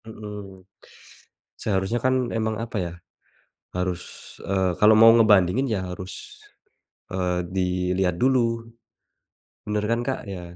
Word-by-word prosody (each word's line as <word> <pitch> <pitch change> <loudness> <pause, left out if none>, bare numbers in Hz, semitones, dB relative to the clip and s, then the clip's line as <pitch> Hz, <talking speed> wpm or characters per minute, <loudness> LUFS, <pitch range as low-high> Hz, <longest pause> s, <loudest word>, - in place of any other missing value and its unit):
Mmm, 105 -4 -9 0.9
seharusnya, 100 +3 -1
kan, 130 -1 +2
emang 110 -1 -1
apa 115 -1 -4
ya, 85 - -6 0.8
harus, 90 -1 -1 0.4
eee, 95 -2 0
kalau 105 +1 +7
mau 115 +1 +9
ngebandingin 105 +3 +4
ya 110 -5 -1
harus, 95 0 -9 0.7
eee, 90 -1 -1
dilihat 90 0 0
dulu, 115 -3 +1 1.0
benar 105 0 -1
kan, 115 - +1
Kak 135 - -1
ya? 90 -2 -8
105 Hz, 115 wpm, -24 LUFS, 90-115 Hz, 1.0 s, mau